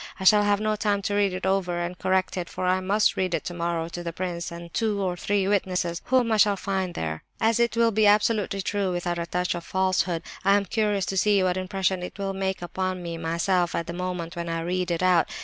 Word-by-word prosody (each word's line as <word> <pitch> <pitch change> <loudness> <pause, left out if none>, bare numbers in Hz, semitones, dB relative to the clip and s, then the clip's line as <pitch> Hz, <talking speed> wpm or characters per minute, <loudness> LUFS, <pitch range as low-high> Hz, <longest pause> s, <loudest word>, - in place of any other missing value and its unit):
I - - -5
shall 210 +2 +7
have 205 -1 +2
no 215 0 0
time 205 -1 0
to 205 - -1
read 205 -1 +2
it 185 +1 -4
over 190 -2 0
and 175 +1 -3
correct 185 0 0
it, 180 -2 -4
for 185 - -4
I 185 +1 +2
must 200 +3 +2
read 185 -2 0
it - - -3
tomorrow 170 -1 -2
to 175 +1 -6
the 170 -1 -4
prince 170 -1 -4
and 170 0 -9
two 220 -3 0
or 185 -2 -1
three 200 +1 0
witnesses 180 -4 0
whom 250 -3 +2
I 220 - +3
shall 205 -1 +4
probably 195 +1 -4
find 180 - -7
there. 80 -1 -4 0.2
"As 225 +1 +2
it 235 0 +1
will 230 -1 +4
be 215 0 +3
absolutely 205 -1 +2
true, 200 -2 -1
without 175 -1 -2
a 170 - -3
touch 180 +1 -1
of 175 -1 -5
falsehood, 185 -2 0 0.2
I 195 +1 +5
am 200 - -1
curious 205 -1 0
to 195 - -3
see 200 0 +3
what 180 -1 +1
impression 185 0 -1
it 180 - -7
will 195 -1 -2
make 190 -1 -2
upon 185 +1 -3
me 170 -1 -5
myself 170 +2 0
at 170 - -1
the 170 - -6
moment 180 -2 -4
when 170 0 -4
I 165 0 -2
read 180 +2 -1
it 170 +1 -1
out. 180 -2 +4
185 Hz, 250 wpm, -25 LUFS, 175-200 Hz, 0.2 s, shall